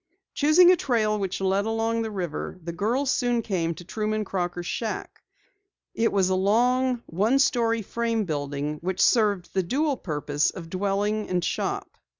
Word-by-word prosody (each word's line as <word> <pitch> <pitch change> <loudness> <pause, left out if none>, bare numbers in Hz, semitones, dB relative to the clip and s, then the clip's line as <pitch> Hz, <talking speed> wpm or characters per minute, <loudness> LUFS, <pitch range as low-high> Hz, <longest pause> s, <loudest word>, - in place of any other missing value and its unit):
Choosing 320 +5 +6
a - - +6
trail 220 -9 0
which 195 -1 -3
led 195 +2 +1
along 225 +1 0
the 225 - -2
river, 185 -5 -4
the 170 - -4
girls 240 +10 0
soon 240 -2 +1
came 170 -5 -1
to 175 - -10
Truman 215 +2 -2
Crocker's 175 -2 -3
shack. 220 +4 -4 0.7
It 230 0 +1
was 195 -2 +2
a - - +3
long, 245 +5 +2
one 210 +10 +1
story 230 -4 +2
frame 230 +1 -1
building 145 -1 -3
which 185 +1 -3
served 205 -6 +2
the 190 - +2
dual 275 - 0
purpose 150 -4 -1
of 165 -3 -9
dwelling 205 +2 -1
and 180 -2 0
shop. - - -3
210 Hz, 160 wpm, -25 LUFS, 180-230 Hz, 0.7 s, Choosing